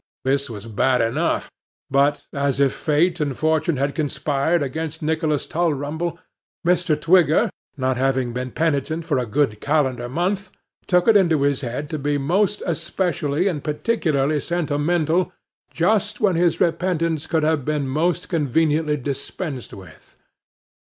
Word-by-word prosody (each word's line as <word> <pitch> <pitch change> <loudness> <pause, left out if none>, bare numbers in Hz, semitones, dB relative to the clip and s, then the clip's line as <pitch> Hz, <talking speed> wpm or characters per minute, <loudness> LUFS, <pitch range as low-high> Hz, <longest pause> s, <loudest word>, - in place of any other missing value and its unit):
This 140 +1 0
was 105 -2 -8
bad 125 +4 +1
enough, 115 0 0 0.4
but, 140 +2 +2
as 140 -1 0
if 140 -2 +3
fate 165 +3 +1
and 145 -4 -2
fortune 155 0 +1
had 140 +2 0
conspired 150 +1 0
against 160 +3 -4
Nicholas 155 -1 0
Tulrumble, 160 +1 -1 0.5
Mr. 175 -3 +2
Twigger, 175 - +4 0.3
not 130 -1 0
having 130 -2 0
been 125 +1 -3
penitent 160 +2 -1
for - - +1
a 125 - -2
good 110 -3 0
calendar 130 -5 0
month, 185 +7 -1 0.4
took 180 +1 +3
it 225 - +6
into 165 -7 +4
his 140 -1 +1
head 130 +3 -4
to 155 - -2
be 145 +1 0
most 190 +9 +1
especially 170 -1 -1
and 155 -7 -2
particularly 150 -4 0
sentimental, 165 +2 0 0.4
just 200 +4 +1
when 195 -4 +2
his 170 0 +2
repentance 165 -3 0
could 160 -2 +1
have 155 -2 +1
been 150 -1 -1
most 165 +6 0
conveniently 155 -1 +1
dispensed 140 +1 -5
with. 95 -4 -14
150 Hz, 140 wpm, -22 LUFS, 140-170 Hz, 0.5 s, it